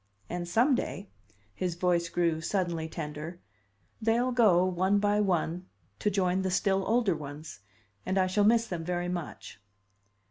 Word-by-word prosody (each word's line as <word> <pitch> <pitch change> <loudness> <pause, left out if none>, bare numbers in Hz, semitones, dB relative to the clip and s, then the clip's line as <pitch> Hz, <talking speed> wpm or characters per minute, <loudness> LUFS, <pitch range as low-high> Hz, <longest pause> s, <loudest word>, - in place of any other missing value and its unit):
And 175 0 -3
some 240 +10 +3
day" 200 -5 -3 0.4
his 180 - -2
voice 175 -1 +1
grew 170 -2 0
suddenly 170 -3 -1
tender 155 +2 -6 0.6
"they'll 235 +3 +2
go, 205 -8 +4
one 185 +2 +1
by 205 0 +2
one, 180 -2 -1 0.3
to 210 - +1
join 190 -2 +1
the 190 - -1
still 190 +1 +1
older 225 -4 +2
ones. 150 -2 -8 0.4
And 190 +1 -1
I 190 - +4
shall 190 +3 +1
miss 230 +2 +4
them 175 -6 -4
very 175 +1 -2
much." 175 - -6
180 Hz, 150 wpm, -29 LUFS, 170-205 Hz, 0.6 s, go